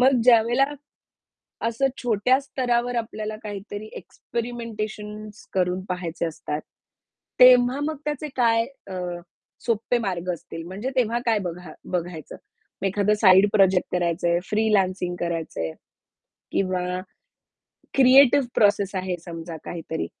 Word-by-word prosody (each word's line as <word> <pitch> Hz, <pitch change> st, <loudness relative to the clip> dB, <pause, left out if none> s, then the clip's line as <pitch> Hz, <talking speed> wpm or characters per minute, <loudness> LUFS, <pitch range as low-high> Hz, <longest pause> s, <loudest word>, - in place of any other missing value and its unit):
मग 255 Hz, -1 st, +5 dB
ज्यावेळेला, 240 Hz, +2 st, +5 dB, 1.0 s
असं 235 Hz, +4 st, +1 dB, 0.2 s
छोट्या 245 Hz, +3 st, +3 dB
स्तरावर 245 Hz, -2 st, -1 dB
आपल्याला 215 Hz, -2 st, -3 dB
काहीतरी 205 Hz, 0 st, -6 dB
एक्स्परिमेंटेशन 215 Hz, -3 st, -6 dB
करून 180 Hz, 0 st, 0 dB
पाहायचे 175 Hz, -2 st, -3 dB
असतात, 155 Hz, -2 st, -4 dB, 0.8 s
तेव्हा 250 Hz, +1 st, +7 dB
मग 310 Hz, 0 st, -2 dB
त्याचे 300 Hz, 0 st, -2 dB
काय 230 Hz, -2 st, +3 dB, 0.2 s
अ, 190 Hz, -, -7 dB, 0.7 s
सोप्पे 230 Hz, +1 st, +1 dB
मार्ग 185 Hz, -5 st, -3 dB
असतील 165 Hz, 0 st, -8 dB
म्हणजे 200 Hz, +8 st, -4 dB
तेव्हा 235 Hz, -1 st, +1 dB
काय 225 Hz, -3 st, +2 dB
बघा 175 Hz, -1 st, -6 dB, 0.2 s
बघायचं? 175 Hz, -3 st, -4 dB, 0.5 s
मग -, -, -1 dB
एखादं 205 Hz, +2 st, +2 dB
साइड 190 Hz, 0 st, +7 dB
प्रोजेक्ट 190 Hz, -3 st, +4 dB
करायचंय 170 Hz, 0 st, +1 dB
फ्रीलान्सिंग 195 Hz, -4 st, +1 dB
करायचंय 165 Hz, -, -3 dB, 0.8 s
किंवा 180 Hz, -1 st, -1 dB, 0.9 s
क्रिएटिव्ह 270 Hz, 0 st, +6 dB
प्रोसेस 200 Hz, -2 st, +3 dB
आहे 185 Hz, -1 st, -2 dB
समजा 165 Hz, -1 st, -7 dB
काहीतरी, 160 Hz, -1 st, -4 dB
210 Hz, 110 wpm, -24 LUFS, 180-240 Hz, 1.0 s, तेव्हा